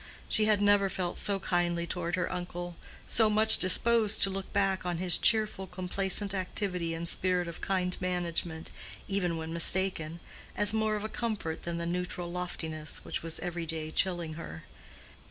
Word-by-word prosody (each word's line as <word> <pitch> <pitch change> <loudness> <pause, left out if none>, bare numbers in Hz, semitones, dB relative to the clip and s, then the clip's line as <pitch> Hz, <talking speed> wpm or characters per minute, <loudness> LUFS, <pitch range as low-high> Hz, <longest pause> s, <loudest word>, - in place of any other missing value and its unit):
She 215 - +2
had 210 -1 +2
never 205 -1 +3
felt 180 -2 -3
so 200 -1 +1
kindly 175 -2 -1
toward 170 0 -3
her 180 -1 -2
uncle, 175 -1 -6 0.3
so 220 -1 +3
much 215 +1 +9
disposed 220 +3 +3
to 195 - +2
look 195 0 -6
back 195 -1 0
on 175 -1 -3
his 180 -1 +2
cheerful, 215 -4 +1
complacent 190 +2 0
activity 180 -3 -2
and 170 +1 -5
spirit 180 0 0
of 170 - -8
kind 180 -2 -1
management, 170 -2 -3 0.4
even 180 -4 -1
when 160 0 -6
mistaken, 170 -1 +1 0.4
as 205 0 +4
more 220 -1 0
of 210 - -4
a - - -2
comfort 215 -9 -4
than 170 0 -4
the 170 - -4
neutral 175 0 -4
loftiness 160 -3 -4
which - - -4
was 165 -1 -3
every 175 -1 -4
day 155 0 -2
chilling 175 -3 -1
her. 80 - -9
180 Hz, 170 wpm, -29 LUFS, 170-195 Hz, 0.4 s, much